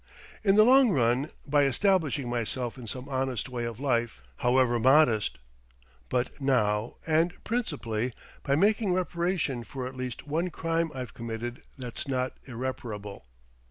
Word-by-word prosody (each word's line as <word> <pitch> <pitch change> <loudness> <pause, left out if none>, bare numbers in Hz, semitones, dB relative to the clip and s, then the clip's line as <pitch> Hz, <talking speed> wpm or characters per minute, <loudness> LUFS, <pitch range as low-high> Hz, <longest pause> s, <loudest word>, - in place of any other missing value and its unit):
"In 195 -2 +4
the 215 - +8
long 260 +2 +7
run, 130 - +2 0.2
by 145 0 +3
establishing 150 -2 +1
myself 120 0 -2
in 125 -3 -9
some 125 +5 -5
honest 130 -3 -2
way 120 -2 -3
of 115 -1 -5
life, 120 - 0
however 125 -1 +3
modest; 130 -3 +4 0.7
but 125 +3 -1
now, 110 -5 +1
and 165 +2 +2
principally, 130 - -2 0.3
by 140 -1 +1
making 205 +3 +3
reparation 175 -7 -1
for 130 +2 -6
at 130 +1 -6
least 130 -1 -5
one 165 +5 -1
crime 165 0 -1
I've 125 -2 -5
committed 115 +1 -5 0.2
that's 125 -1 -6
not 130 -1 -1
irreparable." 115 - -5
130 Hz, 140 wpm, -28 LUFS, 120-160 Hz, 0.7 s, the